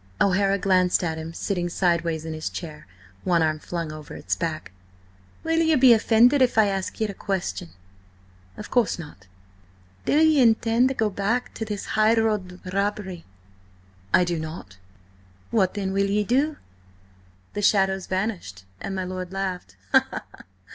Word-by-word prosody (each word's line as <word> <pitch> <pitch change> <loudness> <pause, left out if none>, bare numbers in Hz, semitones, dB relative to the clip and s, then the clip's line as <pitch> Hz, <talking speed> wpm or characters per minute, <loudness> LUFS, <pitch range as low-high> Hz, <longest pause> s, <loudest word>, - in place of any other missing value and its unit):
O'Hara 195 +1 +3
glanced 185 -1 +2
at 160 -2 -2
him 160 +1 -6
sitting 175 0 -2
sideways 170 -3 0
in 160 - -4
his 155 0 -4
chair, 155 -3 -8 0.4
one 170 -2 +2
arm 155 -1 0
flung 165 -1 -4
over 155 -1 -9
its - - -2
back. 160 - -4 0.7
"Will 325 0 +1
ye 320 -1 +3
be 255 -3 +7
offended 235 +5 +4
if 250 -3 +3
I 220 - +6
ask 195 -2 -3
ye 220 - +1
a 205 - -4
question?" 175 - -3 0.9
"Of - - -9
course 245 -4 +2
not." 145 - -11 0.8
"Then–do 310 +2 +4
ye 310 -3 +4
intend 230 +1 +4
to 265 - -2
go 220 -3 0
back 210 +6 -1
to 220 - -5
this 210 -2 -5
highroad 215 -4 +1
robbery?" 200 -3 -2 0.9
"I - - +5
do 175 -2 -2
not." 155 - -8 0.7
"What 195 -4 +2
then 195 -2 -2
will 195 0 +1
you 205 +1 +1
do?" 280 +7 +1 1.0
The 205 - -3
shadows 195 -2 +2
vanished, 185 - -3
and 195 - -5
my 190 - -2
lord 185 0 -5
laughed. 185 - -4
195 Hz, 155 wpm, -24 LUFS, 170-220 Hz, 1.0 s, be